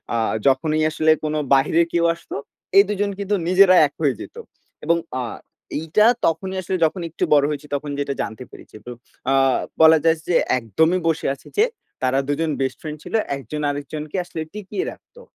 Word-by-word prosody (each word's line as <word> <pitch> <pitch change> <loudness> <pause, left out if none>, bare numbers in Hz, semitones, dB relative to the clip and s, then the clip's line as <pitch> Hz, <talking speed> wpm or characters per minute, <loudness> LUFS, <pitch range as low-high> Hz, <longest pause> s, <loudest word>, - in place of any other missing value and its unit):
আ - - +1 0.3
যখনই 155 +3 +2
আসলে 155 0 +2
কোন 155 0 -1 0.2
বাহিরে 150 +5 +4
কেউ 170 0 +2
আসতো 170 - -10 0.4
এই 200 - +9
২ 210 - -1
জন 205 - +1
কিন্তু 200 +1 0
নিজেরা 185 +1 +6
এক 145 - -21
হয়ে 140 -6 +2
যেত - - -10 0.5
এবং 170 +2 +3 0.2
আ - - -1 0.6
এইটা 165 +7 +2 0.2
তখনই 190 +4 -1
আসলে 185 - -3
যখন 170 +3 -2
একটু 160 - -4
বড় 145 -1 +5
হয়েছি, 150 0 -5
তখন 145 +1 -4
যেটা 140 -1 -1
জানতে 110 +3 -5
পেরেছি। - - -15
তো 125 - -7 0.4
আ - - +3 0.5
বলা 160 0 +8
যায় 165 0 +3
যে 175 - +1 0.2
একদমই 160 - +1
বসে 165 -1 0
আছে 140 - -14
যে, 420 - +6 0.4
তারা 130 +1 +2
২ 145 - +1
জন 165 -1 0
বেস্ট 130 - -1
ফ্রেন্ড 155 -1 -6
ছিল। - - -10 0.2
একজন 145 +4 -6
আরেকজনকে 145 +3 -5
আসলে 165 -2 -6
টিকিয়ে 210 - -4
রাখতো। 485 - -17
160 Hz, 190 wpm, -21 LUFS, 145-175 Hz, 0.6 s, এই